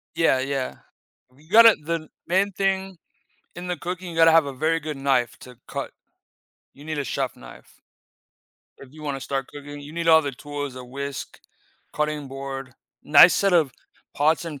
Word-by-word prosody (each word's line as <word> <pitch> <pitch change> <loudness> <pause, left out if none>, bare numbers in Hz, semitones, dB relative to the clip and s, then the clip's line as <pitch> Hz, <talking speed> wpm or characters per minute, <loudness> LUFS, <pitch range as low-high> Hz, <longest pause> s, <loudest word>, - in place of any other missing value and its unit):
Yeah, 160 -5 +3
yeah. 135 0 -2 0.6
You 155 +4 -22
gotta 225 +1 +8
the 160 0 -3 0.2
main 190 +3 +2
thing 195 -1 -1 0.6
in 175 +1 -7
the 180 -1 -2
cooking, 180 0 -5
you - - -9
gotta 165 0 +7
have 165 -2 +5
a 140 - -5
very 160 +5 0
good 155 -2 -6
knife 135 -3 0
to 125 -1 -13
cut. - - -5 0.8
You 145 - -15
need 155 -1 -4
a - - -1
chef 130 - -3
knife. - - -15 1.0
If 135 0 -14
you 155 - -13
wanna 140 -2 -3
start 135 0 -3
cooking, 145 0 -9
you 145 +2 -10
need 170 0 -2
all 160 -1 +7
the 140 -2 -3
tools, 145 0 -6
a 125 - -8
whisk, 140 +2 -7 0.5
cutting 150 -2 -2
board, 135 -1 -7 0.3
nice 150 +4 +8
set 195 -1 +2
of 160 -7 +3 0.4
pots 155 +4 +2
and 150 -5 -7
150 Hz, 175 wpm, -24 LUFS, 135-165 Hz, 1.0 s, gotta